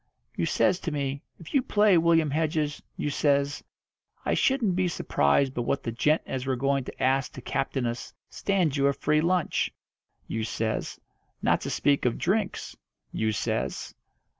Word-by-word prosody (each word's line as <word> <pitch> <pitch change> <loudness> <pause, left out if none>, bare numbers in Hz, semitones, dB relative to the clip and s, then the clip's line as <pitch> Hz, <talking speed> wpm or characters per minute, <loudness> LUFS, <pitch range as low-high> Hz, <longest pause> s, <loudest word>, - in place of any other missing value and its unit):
You - - 0
says 180 - +2
to 170 - -3
me, 140 -1 -2 0.2
'If 165 - -12
you 275 - +4
play, 210 -4 +4
William 165 -2 +4
Hedges,' 155 -1 0 0.2
you 145 - -1
says, 140 0 +1 0.6
'I - - +1
shouldn't 240 -9 +2
be 185 0 +2
surprised 130 - +2
but 120 - -2
what 135 +3 -1
the 115 - -2
gent 150 +7 +2
as 130 0 -4
we're 130 - +1
going 135 +1 0
to - - -6
ask 135 0 +2
to - - -8
captain 135 -1 -1
us 120 +1 -4 0.2
stands 180 -8 0
you 140 0 +3
a 140 - +3
free 150 +2 +1
lunch,' 180 0 +1 0.6
you 110 - -2
says, 110 +1 -2 0.4
'not - - +3
to - - -4
speak 140 -2 +1
of 120 - +1
drinks,' 195 +2 -1 0.4
you 110 0 0
says." 105 - -2
145 Hz, 170 wpm, -27 LUFS, 130-170 Hz, 0.6 s, you